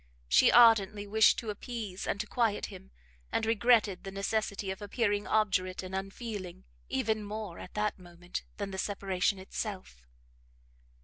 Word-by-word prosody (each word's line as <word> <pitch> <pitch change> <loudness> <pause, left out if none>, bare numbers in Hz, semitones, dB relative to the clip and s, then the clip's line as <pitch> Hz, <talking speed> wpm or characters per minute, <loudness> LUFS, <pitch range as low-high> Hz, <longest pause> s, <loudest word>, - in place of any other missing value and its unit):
She - - +6
ardently 215 -4 +6
wished 220 +2 +5
to 220 -3 -3
appease 210 -3 -6
and 200 - -1
to - - -5
quiet 225 -2 0
him, 65 - -11 0.4
and 225 - 0
regretted 225 -3 +3
the 195 - -6
necessity 200 0 -2
of 190 - -7
appearing 205 0 0
obdurate 185 -4 +1
and 185 0 -8
unfeeling, 195 -1 -5 0.3
even 215 +10 0
more, 210 -3 -6
at - - -10
that 210 -1 -1
moment, 175 0 -7 0.2
than 200 -1 -4
the 190 - -5
separation 195 -1 0
itself. 190 - -6
205 Hz, 145 wpm, -31 LUFS, 190-220 Hz, 0.4 s, She